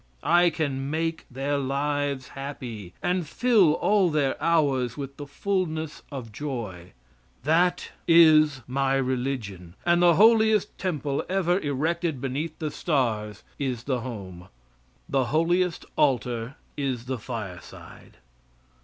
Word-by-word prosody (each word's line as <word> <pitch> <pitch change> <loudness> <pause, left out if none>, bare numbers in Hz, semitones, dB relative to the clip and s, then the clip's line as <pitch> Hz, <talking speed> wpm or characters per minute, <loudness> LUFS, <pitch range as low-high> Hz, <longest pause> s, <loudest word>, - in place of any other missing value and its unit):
I 175 +1 +5
can 140 -4 -2
make 165 +1 -2
their 140 +3 -1
lives 140 0 -1
happy 125 -9 -7
and 180 -2 0
fill 215 -6 +4
all 200 -1 +3
their 145 -4 +1
hours 140 -7 +1
with 140 -1 -6
the 145 - -7
fullness 160 -2 -2
of 125 -6 -6
joy. 105 -10 -6 0.5
That 170 +5 +2 0.2
is 155 -4 +6
my 135 +1 0
religion; 125 -9 -3
and 175 0 +4
the 175 -2 +6
holiest 220 0 +4
temple 150 -7 -2
ever 185 -1 +2
erected 160 +1 -1
beneath 140 +5 -3
the 155 -2 -3
stars 115 - -1 0.2
is 130 -4 -2
the 130 -1 -1
home; 95 -7 -8 0.6
the 135 -2 +1
holiest 165 +5 +1
altar 125 -1 0 0.2
is 130 -4 -2
the 130 -1 -3
fireside. 105 -8 -9
140 Hz, 120 wpm, -26 LUFS, 125-165 Hz, 0.6 s, is